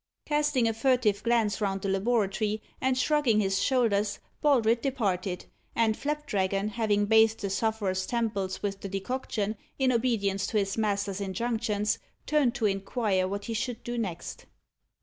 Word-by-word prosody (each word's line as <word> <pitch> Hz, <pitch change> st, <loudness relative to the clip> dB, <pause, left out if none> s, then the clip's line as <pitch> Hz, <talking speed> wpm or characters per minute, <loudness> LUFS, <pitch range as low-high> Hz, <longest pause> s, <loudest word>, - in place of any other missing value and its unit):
Casting 295 Hz, -5 st, +2 dB
a 225 Hz, -, +1 dB
furtive 225 Hz, -4 st, +2 dB
glance 225 Hz, -2 st, +1 dB
round 195 Hz, -2 st, -1 dB
the -, -, -1 dB
laboratory, 210 Hz, +1 st, +1 dB, 0.2 s
and 260 Hz, -1 st, +2 dB
shrugging 260 Hz, -5 st, +3 dB
his 195 Hz, -1 st, +1 dB
shoulders, 215 Hz, -6 st, +2 dB, 0.2 s
Baldred 235 Hz, -6 st, +3 dB
departed; 195 Hz, -9 st, -1 dB, 0.3 s
and 225 Hz, -1 st, +3 dB
Flapdragon 210 Hz, -10 st, -1 dB
having 210 Hz, -2 st, +1 dB
bathed 220 Hz, +1 st, +4 dB
the 200 Hz, -1 st, -2 dB
sufferer's 195 Hz, -3 st, 0 dB
temples 215 Hz, -6 st, -2 dB
with 195 Hz, -1 st, -2 dB
the 200 Hz, -, -5 dB
decoction, 210 Hz, +1 st, -2 dB, 0.2 s
in 265 Hz, -2 st, +3 dB
obedience 220 Hz, -5 st, +1 dB
to 220 Hz, -, -1 dB
his 195 Hz, -1 st, 0 dB
master's 200 Hz, -2 st, -1 dB
injunctions, 215 Hz, +1 st, -1 dB, 0.3 s
turned 280 Hz, -5 st, +2 dB
to 230 Hz, -, 0 dB
inquire 195 Hz, -1 st, 0 dB
what 200 Hz, +1 st, -4 dB
he 230 Hz, -, -3 dB
should 235 Hz, +1 st, -3 dB
do 240 Hz, -, -4 dB
next. 190 Hz, -8 st, -5 dB
215 Hz, 150 wpm, -28 LUFS, 200-240 Hz, 0.3 s, bathed